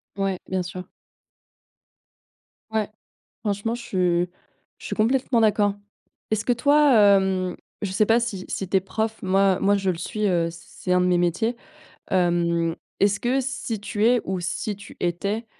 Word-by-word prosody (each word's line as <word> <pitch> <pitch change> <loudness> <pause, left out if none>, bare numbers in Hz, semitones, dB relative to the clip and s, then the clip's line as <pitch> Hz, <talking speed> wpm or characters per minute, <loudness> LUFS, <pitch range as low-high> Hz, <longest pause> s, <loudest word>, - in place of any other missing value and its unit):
Ouais. 195 -2 -1
Bien 190 -1 -1
sûr. 180 +1 -7 1.9
Ouais. 215 -2 0 0.5
Franchement 210 +2 -1
je 240 - -7
suis 180 -4 +1 0.5
je - - -10
suis - - -3
complètement 240 +2 +2
d'accord. 205 -2 +3 0.6
Est-ce 215 0 0
que 245 - +2
toi, 285 +3 +4
hem, 190 -3 +4 0.3
je 200 - -2
sais 210 +2 +3
pas 230 +2 +4
si 200 -6 -3
si 195 - -4
tu 195 - +2
es - - +4
prof? 220 +3 -3
Moi 190 0 +3
moi 200 +1 +3
je 195 -1 -2
le 170 - -2
suis, 210 +4 -2
heu, 170 -3 +2
c'est 170 +1 -15
c'est 180 - +1
un 180 - +4
de 180 - +2
mes 180 - +3
métiers. 185 +8 0 0.5
Hem, 170 -2 +1 0.3
est-ce 200 0 +3
que 255 +3 +1
si 255 -5 -4
tu 210 +1 0
es, 245 -1 +4
ou 190 -1 -2
si 190 +4 -3
tu 205 - -13
étais, 200 +6 -2
200 Hz, 175 wpm, -24 LUFS, 180-220 Hz, 1.9 s, toi